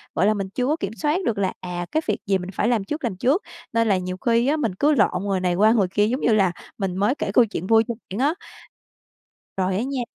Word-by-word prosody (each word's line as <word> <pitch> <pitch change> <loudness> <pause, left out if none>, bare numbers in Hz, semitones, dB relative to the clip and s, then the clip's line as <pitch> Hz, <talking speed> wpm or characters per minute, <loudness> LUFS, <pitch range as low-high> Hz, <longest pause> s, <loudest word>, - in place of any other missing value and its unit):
gọi 180 - +2
là, 215 - +4
mình 195 -2 -4
chưa 250 +6 -2
có 300 - +2
kiểm 195 - -3
soát 300 +2 +2
được 220 -7 0
là, 190 -2 0
à, 175 -1 -4
cái 315 - +1
việc - - +1
gì 195 -1 +3
mình 180 +1 -7
phải 210 - 0
làm 235 -4 +1
trước, 300 +8 -5
làm 220 -6 -2
trước. 275 - +1 0.3
Nên 230 0 +2
là 195 - +3
nhiều 185 0 -4
khi 235 +4 +1
á 300 +3 +2
mình 230 -11 -1
cứ 290 +10 +2
lộn 195 -6 +2
người 195 -2 0
này 180 -1 0
qua 215 +4 +5
người 205 -5 +3
kia 205 +3 +1
giống 255 +5 -2
như 230 - +3
là 195 -4 +3 0.3
mình 195 -3 -2
mới 210 +8 +2
kể - - -3
câu 245 - +5
chuyện 190 -4 -5
vui 225 +1 +5
cho 235 - -2 0.2
bạn 195 - -5
á. 305 - +1 1.2
Rồi, 185 0 0
á 215 - 0
nha 265 -2 -3
210 Hz, 275 wpm, -23 LUFS, 190-245 Hz, 1.2 s, qua